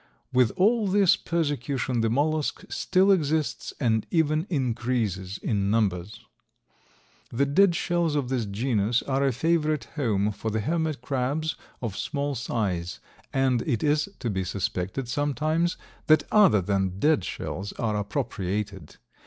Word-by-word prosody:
With 125 -3 +4
all 215 +3 +3
this 195 -1 +4
persecution 140 -6 -1
the 115 - +1
mollusk 150 +5 0
still 190 +2 +2
exists 155 -4 0
and 110 -5 +1
even 160 +1 +1
increases 115 - -1
in 100 -3 -1
numbers. 105 -3 -1 1.0
The 135 +4 +1
dead 175 +6 +4
shells 170 -3 0
of 140 -4 0
this 125 -4 -1
genus 110 +1 0
are 135 0 0
a 135 - +3
favorite 155 +3 +1
home 105 -8 +1
for 105 +2 -4
the 110 0 -1
hermit 160 +1 -1
crabs 140 +4 -1 0.3
of 110 -5 -3
small 145 +4 -2
size, 100 -8 -2 0.3
and 130 -3 +2
it 115 - 0
is 150 +4 +2
to 120 - -3
be 95 -1 -1
suspected 95 +5 -3
sometimes 150 +6 0 0.3
that 155 -1 +6
other 195 - +6
than 95 -1 0
dead 150 - +3
shells 95 +3 -5
are 110 -3 -1
appropriated. 100 -3 -3
130 Hz, 135 wpm, -26 LUFS, 105-155 Hz, 1.0 s, that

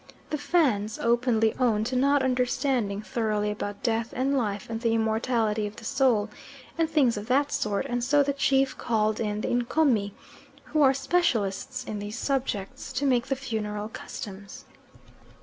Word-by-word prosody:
The 305 - 0
Fans 245 - +1
openly 235 -2 +2
own 225 -4 +2
to 250 +3 -2
not 280 +2 +3
understanding 250 -4 0
thoroughly 210 0 -1
about 205 -1 -5
death 230 -1 0
and 270 +2 +1
life 210 -6 -1
and 225 0 -4
the 230 -1 +2
immortality 220 -1 0
of 205 - -9
the 225 - -11
soul, 255 -6 +2 0.5
and 325 -1 +1
things 275 -8 +3
of 205 +1 -6
that 280 +3 +2
sort, 210 -8 -1
and 245 0 -2
so 285 +3 +4
the 280 0 0
chief 270 -1 +2
called 215 -2 0
in 210 -1 -2
the - - -2
Ncomi, 240 -4 +1 0.5
who 305 - 0
are 270 -2 +5
specialists 255 - 0
in 215 -4 -5
these 205 +3 -6
subjects, 250 -8 -2
to 285 - -1
make 245 -3 +2
the 270 - 0
funeral 215 -5 -4
customs. 200 -2 -8
235 Hz, 165 wpm, -27 LUFS, 210-270 Hz, 0.5 s, are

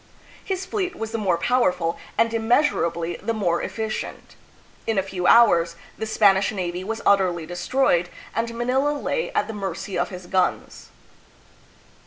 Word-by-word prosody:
His 380 -1 -3
fleet 375 -3 -2
was 225 -5 -5
the 225 - -2
more 185 -5 +1
power 245 +2 +3
ful 170 -2 -2 0.2
and 230 0 +2
immeasurably 220 - +1
the 230 - -2
more 175 -5 0
efficient. 220 -1 -5 0.5
In 225 -2 0
a 190 - +3
few 185 -2 -2
hours 170 -8 +5 0.2
the 220 - -4
Spanish 200 -3 +4
navy 180 -3 -3
was 225 +3 -4
utterly 180 -4 +3
destroyed 175 0 +1 0.2
and 230 0 -1
Manila 265 +5 +1
lay 480 +11 -2
at - - +1
the 225 - -6
mercy 200 -1 -4
of - - 0
his 180 -1 -9
guns. 185 +1 -1
205 Hz, 155 wpm, -23 LUFS, 180-230 Hz, 0.5 s, hours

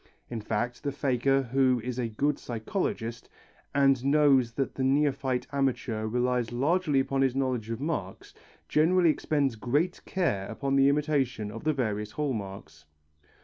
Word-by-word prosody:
In 115 -2 -3
fact 120 +4 -2
the 145 - -2
faker 135 0 +1
who 130 0 +2
is 125 0 -4
a 120 - 0
good 140 +6 -1
psychologist 115 - -4 0.5
and 135 -3 +4
knows 140 -4 +4
that 135 +2 -2
the 135 - -3
neophyte 135 -2 +1
amateur 130 -5 -1
relies 125 0 0
largely 150 +4 +1
upon 135 0 0
his 135 -1 +2
knowledge 130 -5 -1
of 115 0 -3
marks, 140 - -4 0.3
generally 170 +2 +4
expends 145 -5 0
great 145 - -1
care 100 - -1
upon 135 +4 -2
the 135 0 +5
imitation 140 -7 0
of 115 +7 -9
the 155 - +3
various 105 -5 -2
hall 150 -3 -1
marks. 95 -8 -8
130 Hz, 150 wpm, -28 LUFS, 115-140 Hz, 0.5 s, the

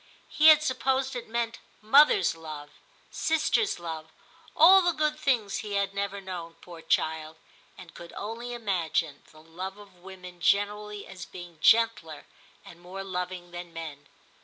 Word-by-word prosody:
He 310 - +4
had 305 -1 +8
supposed 265 -1 0
it 245 - -6
meant 235 0 -2 0.2
mother's 285 - +5
love, 155 -2 -9 0.4
sister's 320 +6 +1
love, 160 -2 -7 0.4
all 370 +5 +8
the 350 -1 +2
good 305 -1 -1
things 245 -9 0
he 210 -2 -6
had 200 0 0
never 200 0 -3
known, 175 -3 -7
poor 170 -2 -13
child; 160 0 -1 0.4
and 175 -2 -13
could 170 0 -11
only 230 +4 -6
imagine 170 -9 -1
the 155 0 -17
love 185 +4 -7
of 205 -1 -15
women 180 -1 -12
generally 210 +2 0
as 180 -3 -10
being 175 -3 -11
gentler 215 -8 +3 0.4
and 170 - -14
more 190 +2 -7
loving 180 -1 -5
than 175 -1 -8
men. 155 -3 -8
195 Hz, 150 wpm, -27 LUFS, 170-235 Hz, 0.4 s, had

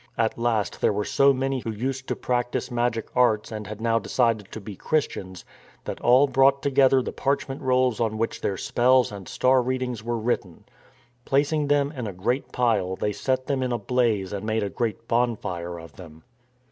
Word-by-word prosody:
At 115 -1 +1
last 115 -3 -1
there - - +3
were 105 0 -2
so 140 0 +4
many 135 0 -1
who 115 - -5
used 130 +4 -3
to - - -1
practise 125 0 -2
^magic 120 -2 0
arts 115 -4 +2
and 105 -2 -6
had 105 +1 -7
now 115 0 +1
decided 115 -5 0
to - - -6
be 105 -1 -8
Christians, 95 - -2 0.4
that - - -6
all 125 +4 +6
brought 135 0 +3
together 135 -2 +4
the - - -4
parchment 140 0 -2
rolls 130 -3 +2
on 110 -2 0
which 115 +1 -2
their 95 - -1
spells 125 +3 +3
and 100 -3 -9
star 130 0 +3
readings 125 -3 -3
were 120 0 -2
written. 110 -6 -2 0.6
Placing 145 +3 +1
them 145 0 +2
in 125 -7 -5
a 100 - -5
great 120 +9 -2
pile 110 -7 +1
they 105 +2 -2
set 130 +2 -1
them 135 -1 -1
in 125 -1 -1
a 120 - 0
blaze 110 -4 0
and 100 0 -4
made 110 0 0
a 100 - -3
great 115 -1 -3
bonfire 90 -8 -1
of 80 0 -13
them. 80 -3 -12
120 Hz, 195 wpm, -25 LUFS, 105-130 Hz, 0.6 s, all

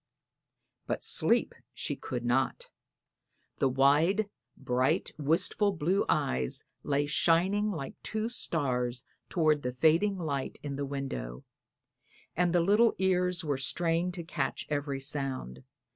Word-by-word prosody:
'" - - -52
But - - -2
sleep - - +2 0.2
she - - -2
could 120 -2 -5
not. 125 +2 0 0.9
The 135 - +3
wide, 155 +11 +3 0.3
bright, 130 +6 0
wistful 180 +7 +2
blue 180 +4 +1
eyes 65 0 0 0.2
lay 145 0 0
shining 185 +8 +2
like 160 -9 -4
two 220 0 -2
stars 125 - -1 0.3
toward 155 -4 +2
the 125 -1 -3
fading 165 +9 +3
light 145 -6 -3
in 140 -2 -4
the 140 0 -3
window, 65 - -5 0.9
and 175 +1 +2
the 175 0 +3
little 210 +6 +4
ears 180 -2 +1
were 145 -3 0
strained 170 +5 0
to 175 - -5
catch 165 - -3
every 145 -1 -1
sound. 135 - -3
150 Hz, 130 wpm, -30 LUFS, 135-180 Hz, 0.9 s, little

